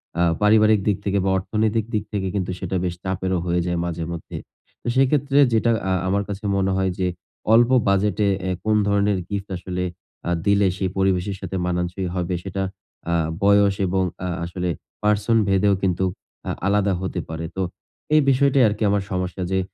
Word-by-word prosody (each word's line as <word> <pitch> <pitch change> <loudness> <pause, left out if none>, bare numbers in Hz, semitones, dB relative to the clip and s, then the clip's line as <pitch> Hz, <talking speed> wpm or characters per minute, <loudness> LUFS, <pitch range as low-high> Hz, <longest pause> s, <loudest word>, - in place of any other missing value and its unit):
অ্যা 85 - +2 0.2
পারিবারিক 110 0 +5
দিক 100 - +2
থেকে 100 0 +1
বা, - - +2
অর্থনৈতিক 110 +3 0
দিক 105 - 0
থেকে 95 -2 -1
কিন্তু 95 -2 -1
সেটা 95 0 -3
বেশ 90 -1 -2
চাপেরও 95 -1 -1
হয়ে 90 0 +1
যায় 90 -1 -1
মাঝেমধ্যে। 85 -1 -5 0.4
তো - - -9
সেক্ষেত্রে 135 +1 +3
যেটা 115 +1 +3 0.2
আ - - +1 0.2
আমার 100 +2 +1
কাছে 100 +1 -5
মনে 95 0 +1
হয় 95 -1 +1
যে 90 - +1 0.5
অল্প 120 +1 +6 0.2
বাজেটে 100 +1 +2 0.2
অ্যা 95 - -1
কোন 110 0 +2
ধরনের 100 -1 +2
গিফট 100 -1 -3
আসলে 90 +1 -4 0.4
আ - - 0 0.2
দিলে 100 -1 +4
সেই 95 -1 -1
পরিবেশের 95 0 +1
সাথে 95 - -5
মানানসই 90 +1 -2
হবে, 90 0 -1
সেটা 95 0 -3 0.5
আ - - +2 0.3
বয়স 100 0 +5
এবং 95 +1 +1 0.2
আ - - -1 0.2
আসলে 90 +1 -3 0.3
পার্সনভেদেও 105 -2 +3
কিন্তু 95 0 +1 0.4
আ - - 0 0.2
আলাদা 100 -1 +2
হতে 95 -1 -3
পারে। 80 +1 -4
তো 95 - -2 0.5
এই 155 - +6
বিষয়টাই 135 0 +4
আরকি 105 +1 -1
আমার 100 -1 +1
সমস্যা 90 0 -2
যে, 95 - +2
95 Hz, 175 wpm, -22 LUFS, 90-105 Hz, 0.5 s, অল্প